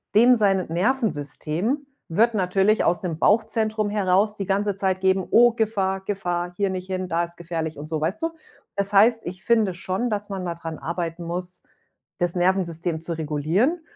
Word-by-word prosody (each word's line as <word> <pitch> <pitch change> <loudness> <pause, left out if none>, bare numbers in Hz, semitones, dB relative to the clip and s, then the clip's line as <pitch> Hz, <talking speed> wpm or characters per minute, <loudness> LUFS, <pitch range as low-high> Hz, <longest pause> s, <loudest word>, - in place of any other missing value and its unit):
dem 240 +4 +7
sein 195 -5 +2
Nervensystem 195 - -1 0.2
wird 220 +7 +2
natürlich 195 +2 +2
aus 175 +3 +2
dem 175 -5 -3
Bauchzentrum 220 0 +1
heraus 205 +1 +2
die 195 - -3
ganze 200 +1 0
Zeit 190 -1 0
geben: 190 -1 +2
„Oh, 240 +1 +7
Gefahr, 200 -4 0
Gefahr, 175 -3 -2
hier 200 -1 +1
nicht 185 -1 -4
hin, 185 -1 -3
da 170 +1 +1
ist 170 0 -11
gefährlich“, 165 -3 -4
und 150 - -7
so, 160 -1 -1
weißt 170 +7 -1
du? 330 - 0 0.5
Das 200 0 -1
heißt, 225 +3 +5
ich 180 +1 -7
finde 220 -5 +3
schon, 190 +6 -2
dass 210 0 -2
man 195 -2 -4
mal 170 -1 -3
dran 165 -1 -7
arbeiten 170 0 -4
muss, 180 +1 -4 0.6
das 175 0 +1
Nervensystem 175 -3 0
zu 170 +1 -1
regulieren, 160 - 0
190 Hz, 175 wpm, -24 LUFS, 170-210 Hz, 0.6 s, dem